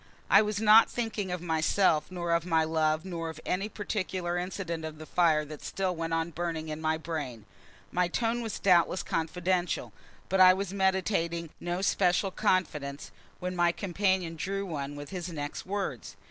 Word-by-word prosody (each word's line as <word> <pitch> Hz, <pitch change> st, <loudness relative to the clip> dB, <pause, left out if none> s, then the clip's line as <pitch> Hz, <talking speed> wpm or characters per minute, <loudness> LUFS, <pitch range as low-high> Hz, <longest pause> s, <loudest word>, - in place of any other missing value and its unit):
I 200 Hz, -, +8 dB
was 210 Hz, -1 st, -1 dB
not 220 Hz, +1 st, +7 dB
thinking 225 Hz, -5 st, -3 dB
of 180 Hz, -1 st, -3 dB
myself, 160 Hz, 0 st, +2 dB
nor 175 Hz, -2 st, -3 dB
of 170 Hz, 0 st, +2 dB
my 165 Hz, -2 st, +2 dB
love, 155 Hz, +1 st, +1 dB
nor 165 Hz, -3 st, -4 dB
of 160 Hz, -1 st, -8 dB
any 195 Hz, +4 st, -1 dB
particular 185 Hz, -4 st, -3 dB
incident 175 Hz, -2 st, -3 dB
of 155 Hz, -1 st, -6 dB
the 155 Hz, -, -9 dB
fire 155 Hz, -3 st, +3 dB
that 150 Hz, 0 st, -9 dB
still 190 Hz, -2 st, -2 dB
went 165 Hz, 0 st, -3 dB
on 165 Hz, +1 st, 0 dB
burning 165 Hz, -1 st, -3 dB
in 155 Hz, +1 st, -5 dB
my 160 Hz, 0 st, +1 dB
brain. 155 Hz, -9 st, -5 dB, 0.5 s
My 180 Hz, 0 st, +2 dB
tone 230 Hz, +6 st, 0 dB
was 225 Hz, -2 st, -4 dB
doubtless 180 Hz, -1 st, +3 dB
confidential, 175 Hz, +2 st, -1 dB, 0.3 s
but 190 Hz, 0 st, +2 dB
I 185 Hz, 0 st, +9 dB
was 195 Hz, 0 st, -3 dB
meditating 190 Hz, -4 st, 0 dB
no 175 Hz, +2 st, -3 dB
special 190 Hz, 0 st, +2 dB
confidence 150 Hz, -7 st, -1 dB, 0.3 s
when 180 Hz, 0 st, -3 dB
my 175 Hz, -1 st, +3 dB
companion 185 Hz, -2 st, 0 dB
drew 195 Hz, +4 st, -2 dB
one 145 Hz, -5 st, -4 dB
with 145 Hz, 0 st, -8 dB
his 180 Hz, -2 st, -4 dB
next 150 Hz, -1 st, -5 dB
words. 190 Hz, -, -4 dB
175 Hz, 175 wpm, -29 LUFS, 160-190 Hz, 0.5 s, I